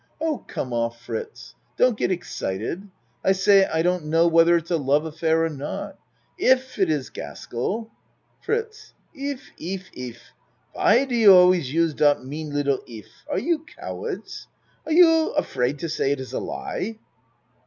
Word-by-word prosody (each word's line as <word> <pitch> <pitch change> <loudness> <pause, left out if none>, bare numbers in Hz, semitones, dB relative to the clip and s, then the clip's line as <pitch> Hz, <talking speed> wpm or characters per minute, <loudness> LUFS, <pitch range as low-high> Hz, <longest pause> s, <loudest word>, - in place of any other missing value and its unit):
Oh, 315 -2 -1
come 125 - -4
off 115 0 -1
Fritz. 445 - -7 0.2
Don't 250 -2 +4
get - - 0
excited. 170 - -4 0.3
I 190 - +4
say 195 0 +5
I 160 0 0
don't 180 -2 0
know 165 +2 +3
whether 165 +1 +5
it's 170 +1 -6
a 170 - +3
love 145 +1 +1
affair 160 +1 +1
or - - -1
not. 145 -2 -6 0.4
If 260 - +2
it 190 -4 +3
is 150 -4 -1
Gaskell 215 - -5 0.5
FRITZ 440 -1 -4 0.2
If 280 -2 -6
if 185 +3 -6
if! 120 -2 -9 0.4
Why 245 +6 +4
do 260 - -5
you 225 -4 +7
always 180 -6 +5
use 165 0 +2
dot 145 -3 +2
mean 150 +2 -6
little 140 -2 0
.'if? 110 -2 -11 0.2
Are - - -1
you 335 -1 +1
cowards? - - -7 0.4
Are - - -3
you 325 -1 +5
afraid 140 - -1
to 165 - -4
say 150 -3 0
it 140 - -1
is 130 - -8
a - - -1
lie? 220 +3 -4
170 Hz, 165 wpm, -24 LUFS, 145-235 Hz, 0.5 s, you